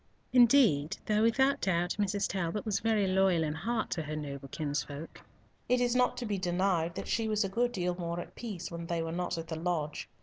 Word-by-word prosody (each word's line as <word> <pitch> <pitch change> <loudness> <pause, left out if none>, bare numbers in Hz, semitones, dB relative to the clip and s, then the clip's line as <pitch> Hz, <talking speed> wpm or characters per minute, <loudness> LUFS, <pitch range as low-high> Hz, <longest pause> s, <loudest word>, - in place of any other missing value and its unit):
Indeed, 235 - +5
though 215 0 +2
without 265 +5 +3
doubt 175 -1 0
Mrs. 205 0 +1
Talbot 190 +2 -2
was 205 -2 0
very 220 -3 +2
loyal 190 -3 +3
in 150 -1 -1
heart 220 +8 -2
to 165 - -1
her 155 0 -5
noble 140 -2 -6
kinsfolk, 145 +1 -4 0.5
it 250 0 +4
is 245 0 +1
not 250 0 +2
to 245 - -3
be 205 -3 -2
denied 175 -2 0
that - - -5
she 225 -1 0
was 215 0 +1
a 195 - -2
good 240 +5 +1
deal 180 -4 -1
more 170 -1 -4
at 175 - -8
peace 200 -8 -6
when 170 0 -6
they 170 -1 -1
were 165 - -4
not 175 0 -2
at 165 0 -5
the 160 - -3
lodge. 160 -3 -2
185 Hz, 215 wpm, -31 LUFS, 165-220 Hz, 0.5 s, Indeed